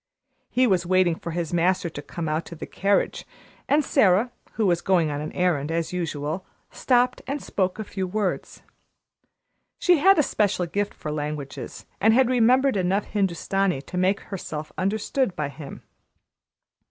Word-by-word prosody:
He 255 +1 +3
was 190 -7 +2
waiting 185 -1 +3
for 165 - -7
his 170 0 -3
master 175 +1 +2
to 155 -3 -7
come 165 +2 -5
out 155 +2 -1
to 170 - -8
the - - -7
carriage, 200 +1 0 0.5
and 290 +1 +3
Sara, 215 -2 +3 0.2
who 220 - 0
was 175 -2 +2
going 175 -5 +2
on 145 0 -3
an 155 - -5
errand 165 -5 0
as 165 +1 -2
usual, 160 0 -3 0.3
stopped 250 0 +1
and 280 +2 -2
spoke 190 -7 -1
a 220 - -3
few 190 -2 -4
words. 200 0 -3 1.1
She 355 -4 +4
had 390 +6 +6
a 305 - +5
special 205 -7 0
gift 200 +4 -2
for 150 - -5
languages 150 -2 -5
and 220 +1 +4
had 260 -1 +4
remembered 255 0 +4
enough 190 +2 +1
Hindustani 195 -4 0
to - - -9
make 185 +2 +1
herself 155 -6 -6
understood 205 +3 -1
by 150 -2 -2
him. 145 0 -10
185 Hz, 165 wpm, -24 LUFS, 165-215 Hz, 1.1 s, had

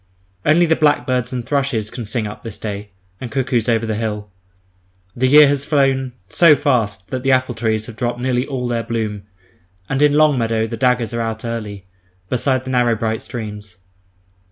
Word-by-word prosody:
Only 165 +3 +4
the 160 -1 +3
blackbirds 130 -5 +1
and 125 -2 -4
thrushes 135 -7 -1
can 120 - -6
sing 110 +1 -2
up 105 - -7
this 115 -3 -7
day, 105 -1 -6 0.3
and 125 - -7
cuckoos 125 -4 0
over 115 -1 +1
the 110 - -2
hill. 105 -2 -4 0.8
The 130 +2 +1
year 150 +2 +8
has 140 0 +1
flown 135 -3 +1
so 165 - +6
fast 115 - 0
that 130 -1 -2
the 135 +1 +1
apple 130 0 +2
trees 110 -2 -1
have 110 -2 -10
dropped 120 0 -2
nearly 125 0 0
all 130 -3 -3
their 120 -1 -1
bloom, 110 -3 -4 0.6
and 135 +5 -1
in 150 -1 +5
"long 150 -3 +4
meadow" 115 -1 0
the 115 +1 -5
"daggers" 125 0 +1
are 115 - -1
out 110 0 -4
early, 105 -4 -5 0.4
beside 130 +1 0
the 130 - -5
narrow 120 -2 +2
bright 110 0 -2
streams. 105 -4 -7
120 Hz, 185 wpm, -19 LUFS, 110-135 Hz, 0.8 s, year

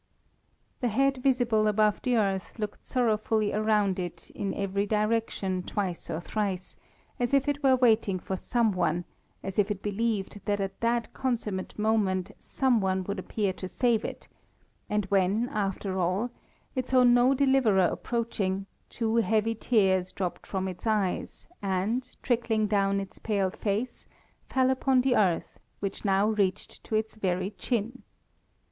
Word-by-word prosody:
The 250 - 0
head 270 +4 +2
visible 245 -4 +2
above 210 0 +2
the 250 -2 +1
earth 195 -2 -1
looked 210 -2 -5
sorrowfully 220 -3 +1
around 210 -3 +2
it 175 -2 -6
in 195 - -3
every 200 +1 -1
direction 210 -3 0
twice 185 -2 -3
or 160 - -2
thrice, 190 0 -3 0.4
as 245 +3 +2
if 275 0 +2
it 290 0 0
were 265 -2 +5
waiting 220 -6 +3
for 190 +1 -4
some 230 +3 +1
one, 175 -1 0 0.4
as 195 +1 -3
if 205 0 +3
it 205 -1 -3
believed 205 -1 -2
that 205 -1 0
at 195 0 -3
that 235 0 0
consummate 220 -7 -2
moment 205 -3 +1
some 255 -5 +1
one 190 -1 0
would 200 +1 -4
appear 200 0 -1
to 185 - -6
save 235 +2 +1
it, - - -6 0.6
and 210 -1 0
when, 200 +4 +2
after 195 -2 -2
all, 185 +7 0 0.4
it 255 -2 -2
saw 255 -1 +4
no 245 +2 +5
deliverer 265 -7 +4
approaching, 200 -3 -1 0.2
two 230 -1 -1
heavy 225 0 +2
tears 190 -5 +2
dropped 185 -1 -4
from 190 -1 -2
its 185 +4 -6
eyes 210 -4 -1
and, 200 +6 -1
trickling 230 -3 +1
down 200 -1 +2
its 195 -1 -7
pale 200 -4 0
face, 210 +6 -3 0.4
fell 260 0 +3
upon 260 0 +3
the 250 -1 +2
earth 185 -5 +1 0.2
which 195 -1 -4
now 195 0 +3
reached 205 -3 -1
to 220 - -3
its 220 0 -1
very 185 -1 -1
chin. 235 +2 -2
210 Hz, 155 wpm, -28 LUFS, 195-235 Hz, 0.6 s, were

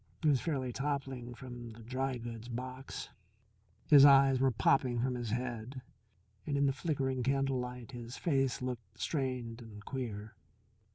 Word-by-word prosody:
He 155 - +5
was 135 -4 +3
fairly 130 -6 -1
toppling 135 -3 -3
from 120 -2 -8
the 115 +1 -12
dry 130 +2 -2
goods 115 -1 -7
box. 130 +2 -6 0.8
His 145 -2 +8
eyes 135 -2 +7
were 135 0 +4
popping 125 +1 +2
from 125 +2 +1
his 120 -2 -3
head, 125 +2 -3 0.6
and 145 -2 0
in 140 - +3
the 135 - +3
flickering 135 -3 -1
candlelight 125 -2 -1
his 120 0 -7
face 135 -7 +1
looked 115 -4 -5
strained 125 -5 -2
and 105 -2 -11
queer. 110 -5 -5
125 Hz, 150 wpm, -33 LUFS, 120-135 Hz, 0.8 s, His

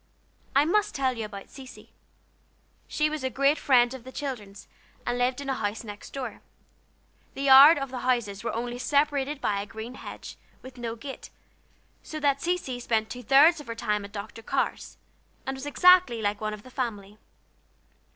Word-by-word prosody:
I 280 +2 +5
must 420 +5 +1
tell 260 -2 0
you 225 -2 -4
about 200 -2 -9
Cecy. 260 -1 -12 1.0
She 305 - +1
was 305 -2 -4
a 260 - 0
great 275 +3 +2
friend 245 -3 +4
of 260 -3 -9
the 260 - -10
children's, 225 -9 -6 0.4
and - - -1
lived 250 +2 0
in 280 - -7
a 270 - 0
house 215 -3 -3
next 205 -2 -10
door. 270 -2 -6 0.9
The 275 - -4
yards 280 +3 +9
of 275 -2 -5
the 255 - -4
houses 235 -5 -1
were 235 - -2
only 240 +1 -4
separated 285 +1 +1
by 200 -6 -1
a 205 - -7
green 220 +3 -8
hedge, - - -9 0.3
with 260 -1 -12
no 230 -1 -4
gate, 270 +3 -9 0.7
so 310 - -7
that 280 -2 +1
Cecy 340 -8 -2
spent 220 -2 -1
two 250 - -6
thirds 280 +7 +5
of 295 - -11
her 230 - -5
time 210 -2 -1
at 200 - -10
Dr. 205 +2 -8
Carr's, - - -2 0.5
and 265 - -3
was 265 +2 -7
exactly 355 -5 +5
like 205 -1 -1
one 215 0 -2
of 210 - -15
the 255 - -14
family. 210 -5 -5
255 Hz, 185 wpm, -27 LUFS, 220-280 Hz, 1.0 s, yards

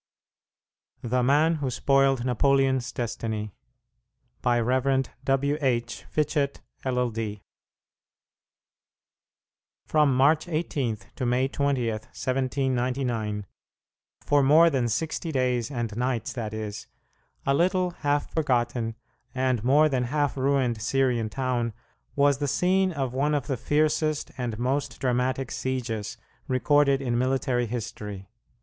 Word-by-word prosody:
THE 125 +1 +1
MAN 150 +6 +3
WHO 140 -3 -2
SPOILED 135 -1 +2
NAPOLEON'S 130 0 +2
"DESTINY" 110 -3 -4 0.9
By 120 -1 +2
Rev. 130 +3 +1 0.2
W. 140 +2 +1
H. 120 -3 -1
Fitchett, 150 -2 0 0.2
LL.D. 115 -5 -2 2.4
From 150 -4 +3
March 150 +5 +4
18 150 -8 -1 0.2
to 130 - -3
May 125 +2 +2
20, 140 -3 0
1799 125 -2 -2 0.8
for 145 0 +4
more 155 +5 +6
than 130 -4 +1
sixty 160 +6 -2
days 125 -4 0
and 120 -6 -3
nights, 120 -1 -1
that 115 -4 -4
is 110 -1 -6 0.6
a 140 - +3
little, 180 +3 +2
half 145 0 0
forgotten, 120 -6 0 0.4
and 130 -3 0
more 145 +5 +5
than 130 -4 0
half 145 +3 0
ruined 130 -4 +1
Syrian 120 -1 +1
town 125 -2 -1 0.4
was 140 -1 +3
the 145 - -1
scene 185 +6 +2
of 135 -6 -3
one 145 +3 +1
of 140 -4 -1
the 135 - -1
fiercest 155 +3 0
and 120 -4 -3
most 130 +4 -1
dramatic 130 0 0
sieges 120 -5 -3 0.3
recorded 140 +2 +3
in 120 -2 0
military 130 -1 0
history. 105 -4 -6
130 Hz, 115 wpm, -26 LUFS, 120-140 Hz, 2.4 s, more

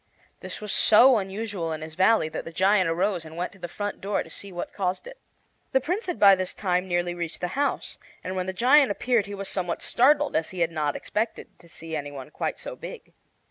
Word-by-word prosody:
This - - -7
was 210 -2 -3
so 240 +3 +6
unusual 195 -3 -4
in 155 - -6
his 155 0 -8
valley 190 +1 +3
that - - -5
the 165 - -8
giant 190 +1 +3
arose 180 +1 0
and 160 +1 -11
went 180 +1 -2
to 195 - -18
the 175 - -5
front 205 +4 -5
door 200 +1 -1
to - - -14
see 200 - -6
what 175 -1 -6
caused 185 -2 -2
it. - - -11 0.5
The 265 - +5
Prince 365 - -2
had 355 - -3
by 200 -1 +8
this 185 -1 -1
time 180 -2 0
nearly 175 -1 0
reached 170 -2 -5
the 180 - -2
house, 280 +7 -2 0.2
and 185 - -4
when 185 0 -2
the - - -1
giant 260 +8 +5
appeared 220 0 +1
he 205 - -6
was 195 0 -5
somewhat 180 -3 -2
startled, 290 +4 +3
as 160 0 0
he 185 -2 -5
had 170 0 +2
not 150 -3 -1
expected 220 +2 -3
to 170 - -18
see 165 -1 -6
any 145 -1 -4
one 135 -2 -9
quite - - -3
so - - -6
big. - - -10
190 Hz, 235 wpm, -26 LUFS, 170-215 Hz, 0.5 s, by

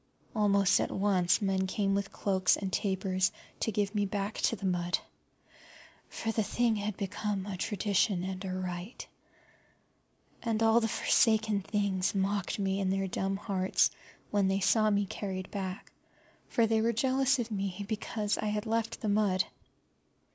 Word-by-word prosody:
Almost 200 -3 +4
at - - 0
once 190 -1 +2
men 190 -1 +1
came 195 +1 0
with 200 0 -1
cloaks 190 -2 +2
and 190 -2 -4
tapers 190 -2 +1 0.3
to 225 - 0
give 205 0 -1
me 205 -1 +1
back 200 +1 -3
to - - +2
the 195 - -7
mud, 175 -1 +1 1.1
for 225 - -3
the 220 - 0
thing 230 +1 +1
had 205 -1 -3
become 200 0 -2
a 200 -2 -4
tradition 200 -1 0
and 190 0 -4
a 190 - -3
rite. 185 +3 -5 1.3
And 225 -1 0
all 225 +1 +5
the 225 - 0
forsaken 220 -1 +2
things 195 -2 0
mocked 195 0 0
me 195 -1 0
in 190 -1 0
their 195 0 0
dumb 195 +1 -1
hearts 195 -2 +1 0.4
when 205 -2 +2
they 195 +1 +1
saw 215 +3 +3
me 205 -1 +2
carried 190 -1 -5
back, 190 -2 -5 0.6
for 230 - +3
they 220 0 +2
were 230 +1 +2
jealous 265 +3 +2
of 235 -2 -3
me 195 -1 -3
because 210 -1 -2
I - - -2
had 210 +1 -1
left 225 0 -1
the 215 - -1
mud. 200 -3 +3
200 Hz, 160 wpm, -31 LUFS, 190-215 Hz, 1.3 s, all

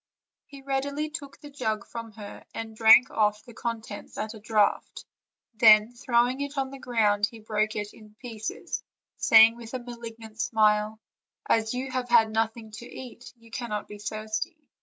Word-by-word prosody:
He 275 -1 -13
readily 280 +3 -2
took 285 -3 -8
the 290 - -12
jug 220 -7 -2
from 230 -2 -8
her, 205 -2 -10
and 225 -1 -6
drank 225 +3 +7
off 210 -1 +1
the 240 - -13
contents 225 -3 -6
at 215 +1 -4
a 220 - -11
draught; 210 -1 0 0.5
then, 215 0 +6
throwing 245 +2 +1
it 285 0 -5
on 270 -1 -1
the 275 - -9
ground, 210 -5 +2
he 230 - -12
broke 215 0 -1
it 210 -1 -4
in 215 -1 -17
pieces, 225 -2 -5 0.4
saying 225 +1 +7
with 235 +1 -8
a - - -2
malignant 230 -2 -8
smile: 215 -1 +2 0.5
"As 225 +1 +1
you 260 +1 -4
have 255 -1 -3
had 220 -2 +5
nothing 220 0 -2
to 220 +3 -9
eat, 250 -1 -10
you 230 0 -20
cannot 225 -3 -4
be 210 - -10
thirsty." 215 - -4
225 Hz, 170 wpm, -27 LUFS, 215-245 Hz, 0.5 s, drank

